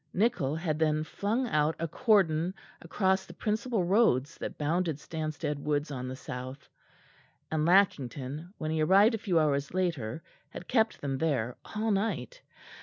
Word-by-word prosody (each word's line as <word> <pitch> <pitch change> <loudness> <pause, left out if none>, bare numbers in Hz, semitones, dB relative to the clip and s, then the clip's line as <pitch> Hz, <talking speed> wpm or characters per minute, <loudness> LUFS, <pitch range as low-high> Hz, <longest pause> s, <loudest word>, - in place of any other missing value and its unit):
Nichol 185 - +1
had 160 -2 -2
then 155 -1 +2
flung 220 +10 -1
out 155 -1 +2
a 165 - -2
cordon 180 -3 +2 0.3
along 190 +3 +1
the - - -11
principal 215 -1 -1
roads 175 - +3
that - - -5
bounded 160 +1 0
Stanstead 155 -1 -4
Woods 145 +1 -1
on 130 -2 -4
the 130 - -5
south; 130 +1 -7 0.8
and 155 0 +1
Lackington, 155 -4 +1
when 155 -1 -3
he 160 0 0
arrived 195 +8 +5
a 225 - -1
few 190 -5 0
hours 145 0 0
later, 160 -8 -1 0.3
had 175 - -9
kept 225 -3 +1
them 135 -2 -2
there 130 -7 0 0.2
all 220 +1 0
night. 225 - -2
160 Hz, 155 wpm, -29 LUFS, 145-195 Hz, 0.8 s, arrived